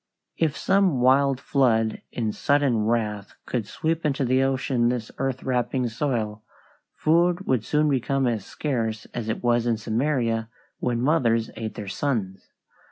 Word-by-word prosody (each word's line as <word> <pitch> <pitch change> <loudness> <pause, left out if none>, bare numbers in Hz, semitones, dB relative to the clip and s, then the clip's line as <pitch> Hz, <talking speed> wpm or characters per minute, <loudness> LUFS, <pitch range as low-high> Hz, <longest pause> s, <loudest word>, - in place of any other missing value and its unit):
If 155 -4 0
some 190 -8 +2
wild 135 +1 +4
flood 115 -7 +1
in 110 -3 -2
sudden 140 -5 +1
wrath 105 -3 -1
could 115 -5 -2
sweep 160 +1 -2
into 140 -2 0
the 130 +2 +3
ocean 130 -2 +1
this 120 -3 -3
earth 135 -1 -2
wrapping 125 0 0
soil, 110 -4 -2 0.5
food 175 +4 +2
would 125 -4 +1
soon 150 +5 +1
become 135 0 +1
as 115 -5 0
scarce 115 -7 -3
as 115 -2 -4
it 110 - -3
was 120 -1 +2
in 115 -2 +1
Samaria 115 0 0 0.3
when 120 -1 -1
mothers 115 -7 +2
ate 110 -1 -5
their 105 -3 -6
sons. 100 -3 -3
125 Hz, 150 wpm, -25 LUFS, 115-140 Hz, 0.5 s, wild